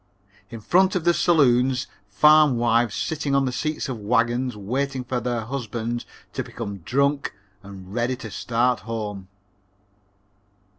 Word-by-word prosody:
In 115 -2 -8
front 185 - +3
of 180 - 0
the 175 +1 +4
saloons, 130 -7 +3 0.2
farm 150 +2 +5
wives 115 -1 +2
sitting 145 -3 -1
on 135 0 +3
the 130 - -1
seats 155 +5 -2
of 125 -4 -5
wagons, 120 +2 0
waiting 130 +6 -2
for 125 0 -2
their 120 0 -2
husbands 120 -1 -4 0.3
to - - -2
become 100 -4 -7
drunk 140 - 0 0.3
and 95 -2 -11
ready 120 +2 0
to 115 -4 -9
start 120 +1 0
home." 105 -4 -5
125 Hz, 140 wpm, -23 LUFS, 115-140 Hz, 0.3 s, farm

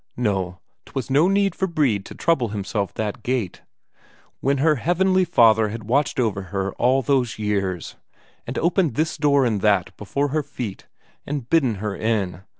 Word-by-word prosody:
No, 95 -6 -1 0.3
'twas 135 0 -5
no 150 +6 +4
need 195 -1 +2
for 190 - -1
Brede 135 - 0
to - - -10
trouble 150 -8 +1
himself 100 -1 -3
that 105 -2 -3
gait 120 -7 -2 0.8
when 140 +1 +1
her 150 +2 +3
Heavenly 185 +2 +2
Father 110 -8 +4
had 115 +1 -6
watched 135 +6 0
over 105 -5 0
her 95 +1 -3
all 130 +2 +2
those 125 -2 +1
years, 100 -4 -2 0.5
and 125 - -4
opened 170 - +1
this 155 +3 0
door 140 -3 +3
and 110 -5 0
that 100 -4 +2
before 140 +8 -2
her 155 +3 0
feet, 120 -7 -7 0.4
and 140 -4 -4
bidden 135 -8 +2
her 100 0 -4
in. 100 -6 -1
120 Hz, 165 wpm, -22 LUFS, 105-145 Hz, 0.8 s, no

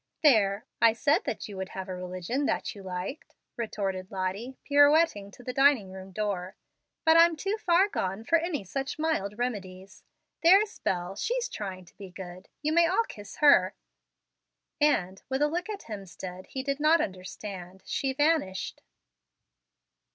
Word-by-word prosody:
"There, 215 -7 +4 0.2
I 230 -1 +6
said 280 +6 +2
that - - -3
you 205 - -9
would 190 0 -4
have 190 0 -6
a 185 - -4
religion 185 +9 -3 0.2
you 200 - -11
liked," 185 +8 -6 0.2
retorted 195 -5 -3
Lottie, 195 +7 -3
pirouetting 290 -7 +4
to 245 - -15
the 250 - -4
dining 270 -8 +4
room 190 0 -9
door. 190 -2 -3 0.5
"But 320 0 +6
I'm 335 0 +6
too 390 +7 -2
far 360 +1 +4
gone 195 - -3
for 330 +8 +3
any 325 - -2
such 270 +8 -4
mild 260 -11 -1
remedies. 195 -6 -5 0.4
There's 390 +5 +5
Bel, 180 +1 -2
she's - - -1
trying 190 - -6
to 170 - -22
be 195 -2 -9
good. 180 0 -10
You 305 +1 +1
may 340 0 +5
all 380 +6 +2
kiss 205 -1 -10
her"; 205 -11 +6 1.0
and, 195 -11 +2
with 265 +2 +1
a - - +4
look 350 +6 -3
at 415 -2 -5
Hemstead 185 -3 -8
he 265 - -5
did 275 +1 -2
not 310 +3 +5
understand, 185 - -6
she 270 - -1
vanished. 290 -9 0
215 Hz, 160 wpm, -28 LUFS, 190-295 Hz, 1.0 s, I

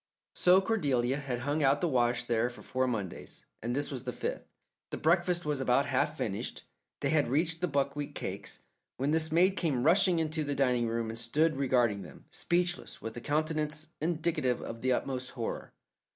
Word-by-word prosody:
So 180 +2 +5
Cordelia 140 - +1
had 130 -4 -3
hung 145 +4 0
out 140 0 +4
the 175 - +1
wash 120 -4 +2
there 120 0 +1
for 120 - -12
four 130 0 0
Mondays, 105 -7 -5 0.2
and 120 +2 -2
this 145 +1 -1
was 130 -3 -4
the 125 - -3
fifth. - - -4 0.4
The - - -4
breakfast 175 +1 +2
was 150 -3 0
about 125 -2 +3
half - - 0
finished - - -3 0.4
they - - +1
had 155 -2 +3
reached 160 +5 0
the 180 - +2
buckwheat 140 0 -1
cakes - - -5 0.3
when 135 +3 0
this 160 0 +2
maid 185 +4 +4
came 140 -8 0
rushing 180 +2 +5
into 160 -1 -1
the 145 -1 -2
dining 125 -3 +2
room 115 0 -2
and 115 - -3
stood 150 +7 +2
regarding 125 -6 +2
them, 90 - -12
speechless, 175 0 -1
with 115 0 -6
a 120 - -6
countenance 155 +1 -1
indicative 160 -6 0
of 115 0 -7
the 130 - +1
utmost 130 0 -1
horror. 115 - -4
140 Hz, 185 wpm, -31 LUFS, 125-160 Hz, 0.4 s, So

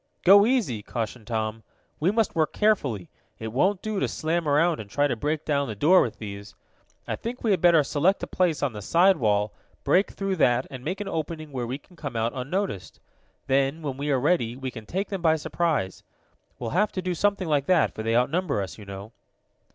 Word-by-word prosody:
"Go 200 +3 +7
easy!" 225 - 0
cautioned 110 +1 -5
Tom. 110 -1 -2 0.4
"We 165 - +2
must 220 0 +1
work 160 -2 0
carefully. 140 - +1 0.3
It 110 - -5
won't 185 +9 +1
do 215 -2 -2
to - - +1
slam 165 +1 -1
around 155 +2 +3
and 105 -2 -8
try 145 +7 +1
to 140 - 0
break 150 +6 -2
down 140 -2 +1
the 110 - -5
door 170 - +5
with 115 - -2
these. 100 -1 -8 0.5
I - - -1
think 240 +2 -6
we 225 - +2
had 185 -4 +2
better 170 -3 +6
select 160 +8 +1
a - - +1
place 175 -5 0
on 135 -5 0
the 105 - -7
side 180 - +4
wall, 105 -2 +1 0.3
break 190 +3 +3
through 195 -1 -3
that, 125 -4 +3
and 130 -2 -8
make 185 +7 -3
an 205 - -4
opening 155 -3 -4
where 125 -3 -3
we 130 +3 -3
can 175 +5 -22
come 145 -7 -6
out 115 +1 0
unnoticed. 135 - -3 0.5
Then, 135 +4 +1
when 140 -3 -3
we 145 +1 -3
are 135 -2 +2
ready, 125 -5 +1
we 130 0 -5
can 110 -3 -10
take 190 - -2
them 195 -3 -4
by 160 -2 +4
surprise. 150 - -1 0.6
We'll 115 -2 -4
have 205 +7 +2
to 185 - -2
do 180 -1 -1
something 200 +1 0
like 145 -3 +1
that, 180 -4 +3
for - - -6
they 115 +1 0
outnumber 140 - +1
us, 95 +2 -5
you 105 - -10
know." 100 +2 -8
145 Hz, 220 wpm, -26 LUFS, 120-180 Hz, 0.6 s, Go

